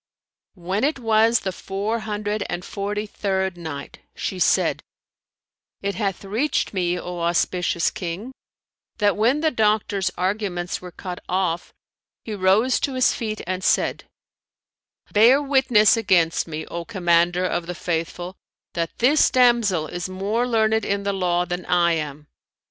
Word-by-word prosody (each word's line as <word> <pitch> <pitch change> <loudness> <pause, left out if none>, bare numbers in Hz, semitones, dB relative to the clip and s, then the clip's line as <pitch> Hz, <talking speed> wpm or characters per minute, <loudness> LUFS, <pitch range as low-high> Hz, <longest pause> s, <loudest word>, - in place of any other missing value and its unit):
When 190 +4 -2
it 295 +2 +1
was 225 -1 +3
the 190 - -2
Four 200 +5 -3
Hundred 210 -1 -3
and 175 0 -4
Forty 205 +1 -3
third 190 -3 -2
Night, 160 -5 -7 0.2
She 185 - -4
said, - - +2 1.0
It 200 0 -1
hath 195 -2 -3
reached 225 +9 -1
me, 180 -2 0
O 180 0 -6
auspicious 170 0 +1
King, 185 +8 -5 0.7
that 205 -2 +2
when 240 +8 +2
the 315 -1 +2
doctor's 210 -4 +1
arguments 185 -2 -2
were 180 - -8
cut 180 0 -7
off, 180 -2 -1 0.5
he 220 - -4
rose 205 +6 +3
to 275 - -2
his 255 - +3
feet 215 -2 -4
and 185 +1 -3
said, - - +1 1.1
"Bear 235 +6 +6
witness 265 -7 +4
against 180 -8 +2
me, 155 -1 -5
O 170 0 -5
Commander 175 -2 +2
of 175 -1 -2
the 180 - -4
Faithful, 175 +2 -3 0.4
that 165 -1 -3
this 280 +6 +4
damsel 235 -10 +3
is 175 +3 -5
more 205 +6 -1
learned 220 -2 +2
in 200 0 -1
the 200 0 -1
Law 180 -2 +1
than 175 0 -4
I 175 -1 +3
am." 150 -2 -3
195 Hz, 145 wpm, -23 LUFS, 175-220 Hz, 1.1 s, Bear